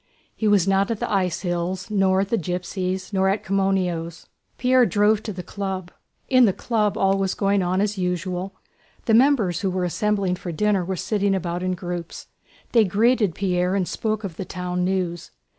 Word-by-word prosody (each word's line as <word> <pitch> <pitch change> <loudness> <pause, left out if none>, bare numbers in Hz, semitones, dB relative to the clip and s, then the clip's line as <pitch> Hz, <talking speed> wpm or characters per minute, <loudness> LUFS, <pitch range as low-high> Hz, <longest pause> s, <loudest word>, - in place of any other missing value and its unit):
He 220 - -1
was 200 -3 +4
not 195 +1 +2
at 225 -2 -2
the - - -3
ice 185 -4 0
hills, 180 +2 -3
nor 190 -2 +3
at 195 - -2
the 230 - +1
gypsies', 185 +2 -3
nor 190 0 +2
at 200 +2 -1
Komoneno's. 185 -4 -1 0.3
Pierre 255 0 +4
drove 210 +2 +3
to 220 - -5
the 180 -2 -6
Club. 190 -3 -5 0.4
In 255 -2 +5
the 195 - +2
Club 215 -2 0
all 195 0 +2
was 190 -1 0
going 200 -1 +1
on 180 +1 0
as 205 -1 -1
usual. 180 +1 -2 0.5
The 225 - +2
members 230 - +3
who 195 - 0
were 185 0 -1
assembling 195 0 0
for 175 - -6
dinner 200 +2 +1
were 190 +2 -3
sitting 200 +1 0
about 175 -1 -3
in 185 0 -1
groups; 175 -1 -6 0.4
they 230 -2 +5
greeted 210 0 +2
Pierre 180 -1 0
and 185 -3 0
spoke 215 -1 -2
of 185 -5 -6
the - - -3
town 180 0 -3
news. 180 -3 -2
190 Hz, 190 wpm, -23 LUFS, 180-205 Hz, 0.5 s, In